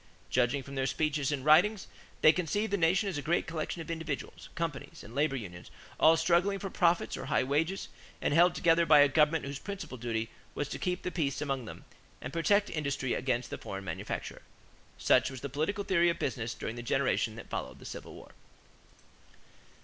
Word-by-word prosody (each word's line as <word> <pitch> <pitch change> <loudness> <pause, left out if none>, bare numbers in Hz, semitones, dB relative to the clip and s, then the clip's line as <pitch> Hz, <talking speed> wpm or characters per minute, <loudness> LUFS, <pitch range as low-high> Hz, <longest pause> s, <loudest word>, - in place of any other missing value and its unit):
Judging 125 +2 +2
from 140 - -10
their 135 -1 0
speeches 150 0 0
and 140 -2 -3
writings, 185 +7 +5 0.4
they 155 - +8
conceived 205 +5 -1
the - - +5
nation 185 +3 +2
as 175 -7 -2
a - - -4
great 170 +5 +1
collection 165 +1 -4
of 165 - -7
individuals, 160 -4 -5
companies, 165 -5 -4
and 115 - -12
labor 145 +1 +1
unions 90 -8 -8 0.3
all 160 +1 +6
struggling 180 +4 +2
for 195 -1 -6
profits 170 0 +2
or - - -6
high - - +2
wages 160 +8 0 0.3
and - - 0
held 175 +3 +5
together 170 0 +4
by 155 -2 +6
a 145 - +7
government 150 +2 +2
whose 140 0 -5
principal 195 - -7
duty 115 -1 -2 0.2
was 145 - -2
to - - -6
keep 180 0 -2
the 180 - -2
peace 145 -6 -1
among 135 -4 -2
them - - -10 0.3
and - - -7
protect 200 +5 +3
industry 140 -4 -1
against 125 -2 -1
the - - -5
foreign 95 0 -6
manufacturer. - - -5 0.6
Such 130 0 +3
was 130 -3 -8
the 140 - -4
political 160 - -1
theory 175 -3 +3
of 170 - -1
business 115 -4 -3
during 115 - -5
the - - -4
generation 120 - 0
that - - -11
followed 65 - -4
the - - -14
Civil - - -8
War. - - -13
155 Hz, 195 wpm, -31 LUFS, 135-170 Hz, 0.6 s, they